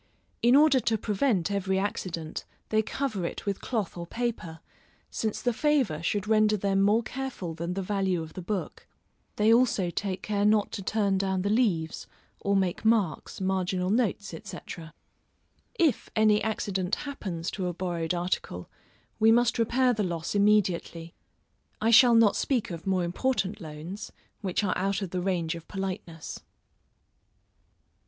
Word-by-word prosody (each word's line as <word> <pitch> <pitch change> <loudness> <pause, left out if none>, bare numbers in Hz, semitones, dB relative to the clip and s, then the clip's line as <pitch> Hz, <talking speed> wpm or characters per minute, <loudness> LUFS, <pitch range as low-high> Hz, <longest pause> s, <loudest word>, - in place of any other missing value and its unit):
In 240 +2 +5
order 290 -2 +6
to 225 -2 +1
prevent 205 -2 0
every 190 -1 0
accident, 175 -5 -3 0.3
they 220 0 +3
cover 220 -3 -3
it 170 - -4
with 200 -1 -2
cloth 220 -7 -2
or 170 -1 -6
paper, 225 -8 -3 0.5
since 220 -2 -2
the 245 - +2
favor 260 - +1
should 205 +4 -1
render 215 -1 +4
them 195 0 +1
more 210 +4 +3
careful 250 -10 -5
than 170 +2 -4
the 195 - -2
value 190 -3 0
of 160 - -10
the 185 - -6
book; 195 +1 -4 0.5
they 215 +2 +4
also 230 -7 +3
take 190 0 -3
care 205 -1 0
not 210 0 +3
to - - -5
turn 200 -1 +1
down 190 -1 0
the 200 - 0
leaves, 190 -9 0 0.3
or 200 0 0
make 190 -1 0
marks, 215 -9 +1
marginal 185 -1 0
notes, 210 -3 0
&c. 200 - -7 1.2
If 320 - +2
any 215 -1 +4
accident 200 -4 -1
happens 190 - -5
to 185 -3 -3
a 175 - -2
borrowed 175 -2 -2
article, 175 - -3 0.5
we 220 +1 +6
must 240 +1 +3
repair 250 +2 +3
the 215 - -1
loss 170 -4 -2
immediately. 190 -5 +1 0.7
I 225 +1 +2
shall 235 +1 +8
not 225 -3 +5
speak 250 -8 0
of 165 +1 -7
more 185 -2 +2
important 205 +2 -1
loans, 165 +7 -7 0.3
which 195 0 -1
are 185 - +1
out 195 +1 0
of 185 - -5
the 180 - -2
range 175 -3 0
of 165 -1 -9
politeness. 185 -5 -5
195 Hz, 155 wpm, -28 LUFS, 180-220 Hz, 1.2 s, shall